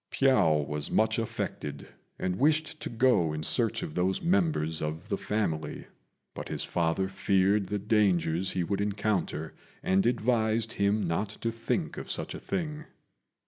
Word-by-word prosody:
Piao 80 - +3
was 75 0 -2
much 110 +1 +2
affected, 75 -9 -4 0.3
and 90 0 -2
wished 155 +2 +2
to - - -5
go 115 -9 +3
in 75 0 -4
search - - +2
of 75 - -5
those 95 +2 +1
members 165 - +1
of 80 +2 -4
the 100 - 0
family; 95 -8 -2 0.5
but - - -7
his - - -2
father 85 +3 0
feared 95 +1 +2
the 105 - -1
dangers 95 -4 +1
he 90 - 0
would 100 +3 -1
encounter, 100 -6 -1 0.3
and 95 +4 +3
advised 115 -1 +1
him 100 -1 +1
not 90 +5 -1
to 115 - 0
think 115 0 -2
of - - -6
such - - -2
a - - -6
thing. 155 -3 -3
100 Hz, 155 wpm, -29 LUFS, 85-115 Hz, 0.5 s, Piao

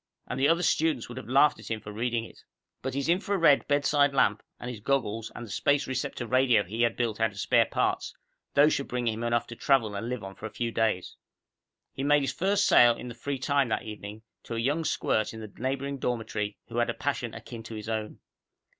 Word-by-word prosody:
And - - -4
the 135 - +4
other 170 +3 +3
students 155 -7 +1
would 120 - -8
have 130 - -11
laughed 140 +3 +4
at - - -10
him 110 -1 -2
for 105 0 -9
reading 115 +1 -1
it. - - -14 0.4
But 130 0 -4
his 140 +1 -1
infra 195 +4 +1
red 150 -5 +4
bedside 145 0 +3
lamp - - +3 0.2
and 120 - -7
his 115 - -8
goggles 115 -2 -1
and 120 - -6
the 105 - -10
space 145 +6 +2
receptor 130 -1 -3
radio 125 -3 +3
he 110 +5 -4
had 120 - +2
built 115 -3 -1
out 110 0 +3
of 100 -2 -11
spare - - +3
parts - - -1 0.4
those 145 +2 +6
should 140 - -2
bring 125 -1 -2
him 115 +1 -1
enough 120 0 +1
to 120 - -9
travel 120 -5 +2
and 100 +4 -4
live 125 -4 -4
on 95 0 -7
for 110 - -7
a - - -9
few 115 +2 -3
days. 110 -5 -1 0.8
He - - -5
made 145 0 +4
his 135 - -1
first 200 +3 +2
sale 120 -1 +6
in 125 - -7
the - - -7
free 135 +4 -4
time 140 -1 +1
that - - -1
evening, 105 0 -8 0.2
to 115 - -5
a - - -1
young 145 +7 0
squirt 110 -6 0
in - - -7
the 110 -2 -9
neighboring 135 +2 -2
dormitory 110 -4 -2
who 120 - -2
had 120 - +1
a 115 - -2
passion 130 -5 -2
akin 115 -2 -8
to 110 0 -8
his 105 0 -7
own. 110 -1 -4
120 Hz, 235 wpm, -28 LUFS, 110-140 Hz, 0.8 s, those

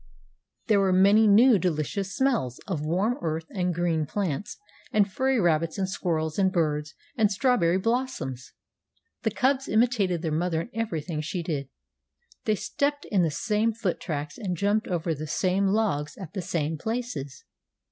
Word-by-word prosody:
There 215 -5 +3
were 195 -1 +3
many 200 +4 +5
new 220 +2 +6
delicious 180 +4 -2
smells 240 - +1
of 170 -7 -3
warm 190 - 0
earth 160 0 -2
and 180 -2 0
green 165 -3 0
plants 195 0 -3 0.3
and 210 -4 +3
furry 260 +4 +1
rabbits 165 -3 +1
and 190 -1 0
squirrels 160 -3 -2
and 190 -1 +3
birds 150 -4 -1 0.2
and 215 -3 +3
strawberry 195 -6 +2
blossoms. 225 - -2 0.7
The 225 - +1
cubs 265 +5 +1
imitated 215 -7 +2
their 160 - -1
mother 165 +1 0
in 235 - -9
everything 170 -8 -3
she 170 +3 -3
did. 145 -5 -3 0.8
They 215 - +2
stepped 285 +7 -1
in 195 -4 +3
the 165 - +2
same 215 +7 0
foot 210 -6 -2
tracks, 150 +1 -5
and 185 -6 -3
jumped 205 +4 +1
over 170 -2 -1
the 155 +1 -6
same 185 +5 +1
logs 190 -9 0
at 185 -6 -9
the 195 - -3
same 160 -3 -2
places. 220 - -4
185 Hz, 160 wpm, -26 LUFS, 160-220 Hz, 0.8 s, new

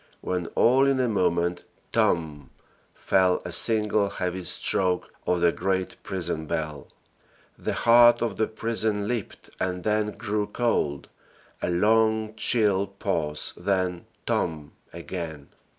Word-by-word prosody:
when 90 -2 -2
all 130 +3 +4
in 135 -1 +2
a 125 - +2
moment 90 -4 0 0.3
"TOMB!" 75 -5 0 0.5
fell 95 -1 +2
a 90 - -5
single 105 0 +2
heavy 90 -1 -3
stroke 90 0 -1
of 90 -1 +1
the 85 -1 +4
great 95 +1 -2
prison 85 -5 -3
bell. 75 -3 -4 0.7
The - - -3
heart 120 0 +6
of 115 -4 -2
the 110 - +1
prison 110 -2 -1
leaped, 120 -4 -5
and 90 -1 -2
then 105 -1 0
grew 105 -1 -2
cold 105 - -1 0.5
a - - -1
long 110 +4 +2
chill 105 -3 +2
pause, 85 -6 -2
then 95 -3 -1 0.2
"TOMB!" 75 -3 -2 0.2
again. 85 -4 -7
95 Hz, 125 wpm, -26 LUFS, 85-110 Hz, 0.7 s, heart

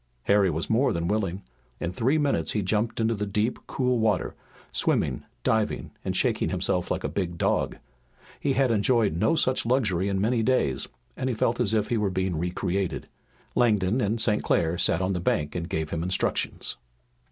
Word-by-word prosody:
Harry 100 -1 +4
was 80 0 -2
more 120 +5 +3
than 85 0 -1
willing. 100 -2 -1 0.4
In 85 - -2
three 130 +10 +2
minutes 140 - 0
he 105 - 0
jumped 105 +5 0
into 115 0 +2
the 105 -1 -3
deep, 105 +4 0
cool 125 -2 0
water, 105 -5 +1 0.4
swimming, - - +1 0.2
diving, 110 -1 0
and - - -1
shaking - - +1
himself - - -1
like - - -2
a - - 0
big 85 -4 -3
dog. - - 0 0.6
He 140 - +1
had 135 -2 +2
enjoyed 110 -3 +2
no 110 - +2
such 130 -4 +2
luxury 105 -7 +1
in 95 -1 0
many 115 +3 +1
days, 110 - +1 0.3
and 130 0 -2
he 125 - -1
felt 115 +2 +1
as 110 -3 +1
if 105 -1 0
he 120 - +1
were 105 -2 +1
being 95 -1 -1
re 90 +2 -1
created. 90 +1 -2 0.5
Langdon 110 -1 +2
and 110 +2 0
St. 105 -1 +1
Clair 80 0 +1
sat 90 - +1
on 95 +1 0
the 90 - -1
bank 75 -4 0
and 85 -1 -4
gave 80 -1 -2
him 80 - -2
instructions. 90 +2 -1
105 Hz, 190 wpm, -26 LUFS, 90-115 Hz, 0.6 s, Harry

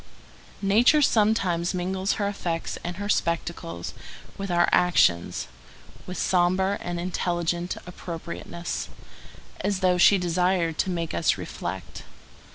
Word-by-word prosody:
Nature 240 +9 +5
sometimes 195 -7 +2
mingles 185 +2 -1
her 205 - -1
effects 175 -5 -3
and 175 0 -4
her 205 +2 -4
spectacles 170 - -2 0.4
with 195 0 -5
our 175 0 +3
actions 175 - +3 0.6
with 180 - -5
sombre 185 +2 +2
and 175 0 -3
intelligent 175 0 -1
appropriateness, 170 -1 -6 0.7
as 195 0 -1
though 180 -1 +3
she 200 +3 +7
desired 180 -1 +1
to - - +1
make 170 -3 -2
us 85 - +2
reflect. 90 +1 -6
180 Hz, 115 wpm, -26 LUFS, 170-190 Hz, 0.7 s, she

